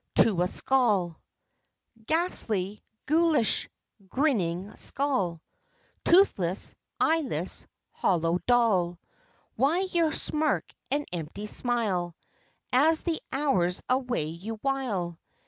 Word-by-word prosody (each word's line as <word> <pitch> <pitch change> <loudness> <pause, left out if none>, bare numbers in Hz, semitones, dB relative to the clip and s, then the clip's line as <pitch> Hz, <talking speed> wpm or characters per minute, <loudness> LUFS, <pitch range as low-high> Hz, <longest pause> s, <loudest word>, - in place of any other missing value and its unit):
TO 195 -6 +4
A 180 - +2
SKULL 205 -9 +1 0.9
Ghastly, 215 - 0 0.2
ghoulish, 310 -5 +2 0.4
grinning 200 - 0
skull, 195 - -1 0.6
Toothless, 205 - +3 0.3
eyeless, 320 -3 0 0.2
hollow, 170 -1 +1
dull, 205 -8 +3 0.6
Why 290 +9 +2
your 335 -3 +2
smirk 305 -1 0 0.2
and 290 +2 0
empty 175 +5 -5
smile 210 -7 -1 0.6
As 310 +5 +4
the 335 -2 -1
hours 195 -11 +1
away 250 - 0
you 180 +8 -6
wile? 215 -12 -2
230 Hz, 90 wpm, -27 LUFS, 180-285 Hz, 0.9 s, TO